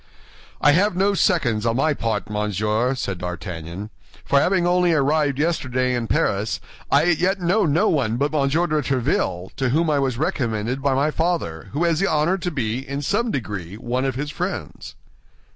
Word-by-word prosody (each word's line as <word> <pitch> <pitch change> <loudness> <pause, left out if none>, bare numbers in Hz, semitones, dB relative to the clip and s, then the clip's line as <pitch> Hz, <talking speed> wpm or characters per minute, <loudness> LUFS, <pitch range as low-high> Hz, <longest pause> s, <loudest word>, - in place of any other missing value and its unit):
"I 145 - +5
have 185 +5 +2
no 195 +2 +2
seconds 120 - +1
on 115 0 +1
my 150 +4 +2
part, 115 -5 -2
monsieur," 105 +4 0
said 100 -7 -4
D'Artagnan; 90 +3 -6 0.3
"for 140 - +4
having 180 +3 +2
only 175 -1 +3
arrived 145 -1 +2
yesterday 130 -5 0
in 120 -2 -2
Paris, 100 +1 0 0.3
I - - +4
as 170 -1 +2
yet 190 +2 +2
know 185 +2 +2
no 155 +3 +2
one 120 -7 +1
but 145 +3 0
Monsieur 155 +3 +1
de 155 -3 0
Tréville, 120 - -1
to 130 -2 0
whom 155 +4 +2
I 145 - +2
was 130 -3 0
recommended 120 -3 -1
by 135 -1 +1
my 145 +3 +2
father, 160 - -2
who 150 +5 0
has 165 -2 +2
the 195 - +2
honor 155 +5 +1
to 180 - -2
be, 120 -7 -2
in 140 +2 -5
some 220 - 0
degree, 100 - -4
one 120 +3 -2
of 135 -2 -1
his 145 +3 -3
friends." - - -5
140 Hz, 185 wpm, -22 LUFS, 110-165 Hz, 0.3 s, I